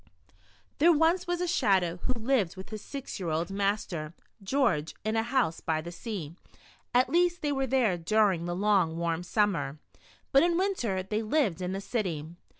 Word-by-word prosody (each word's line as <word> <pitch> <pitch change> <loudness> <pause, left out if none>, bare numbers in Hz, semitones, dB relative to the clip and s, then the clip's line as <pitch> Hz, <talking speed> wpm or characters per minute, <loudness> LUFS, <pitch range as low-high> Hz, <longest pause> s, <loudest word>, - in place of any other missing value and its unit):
THERE 335 +4 +6
was 325 +4 +2
once 350 0 -1
a 360 - 0
Shadow, 190 - +2
who 255 +8 -2
lived 225 -7 +1
with 190 - -9
his 215 -1 -5
six 275 -3 -7
year 180 -3 -3
old 165 +4 -1
master, 195 -5 -2 0.3
George, 195 - 0
in 215 +1 -1
a 225 - +3
house 235 -8 0
by 160 -1 0
the 170 +2 -6
sea. 175 -4 -6 0.6
At 250 +1 +3
least 350 +1 +2
they 295 - +1
were 270 -1 0
there 230 -9 +2
dur 210 +4 +3
ing 170 -2 -3
the 175 0 -2
long, 190 -4 +2
warm 170 0 -1
summer, 180 -6 0 0.5
but 275 - +6
in 340 0 +2
winter 245 - 0
they 210 +3 -2
lived 215 - 0
in 180 +1 -2
the 195 - -3
city. 185 -10 -2
205 Hz, 185 wpm, -29 LUFS, 175-265 Hz, 0.6 s, THERE